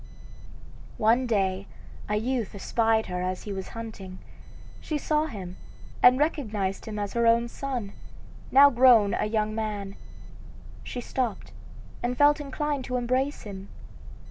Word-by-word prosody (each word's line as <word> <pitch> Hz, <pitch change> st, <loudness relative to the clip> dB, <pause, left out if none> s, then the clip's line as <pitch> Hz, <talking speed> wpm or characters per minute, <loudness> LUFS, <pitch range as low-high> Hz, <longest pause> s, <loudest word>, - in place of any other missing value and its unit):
One 235 Hz, +4 st, +3 dB
day 195 Hz, -3 st, 0 dB, 0.4 s
a 210 Hz, -, +1 dB
youth 230 Hz, 0 st, -2 dB
espied 225 Hz, +2 st, +1 dB
her 180 Hz, 0 st, -4 dB
as 185 Hz, 0 st, -3 dB
he 205 Hz, -, -5 dB
was 190 Hz, -1 st, -5 dB
hunting. 200 Hz, -5 st, -8 dB, 0.6 s
She 305 Hz, -, -3 dB
saw 305 Hz, +1 st, 0 dB
him 185 Hz, -, -8 dB, 0.4 s
and 250 Hz, +1 st, +7 dB
recognized 215 Hz, -, -1 dB
him 215 Hz, -1 st, -5 dB
as 205 Hz, -1 st, -3 dB
her 235 Hz, 0 st, +2 dB
own 235 Hz, +1 st, +4 dB
son, 245 Hz, -5 st, -5 dB, 0.6 s
now 280 Hz, +1 st, +8 dB
grown 235 Hz, -5 st, +5 dB
a -, -, 0 dB
young 215 Hz, 0 st, -1 dB
man. 210 Hz, -3 st, -4 dB, 0.9 s
She 245 Hz, -, -5 dB
stopped 245 Hz, -2 st, -3 dB, 0.5 s
and 245 Hz, +1 st, -2 dB
felt 290 Hz, +1 st, +5 dB
inclined 290 Hz, 0 st, -3 dB
to 250 Hz, -1 st, -2 dB
embrace 255 Hz, +4 st, -1 dB
him. 195 Hz, -2 st, -9 dB
225 Hz, 140 wpm, -26 LUFS, 200-255 Hz, 0.9 s, now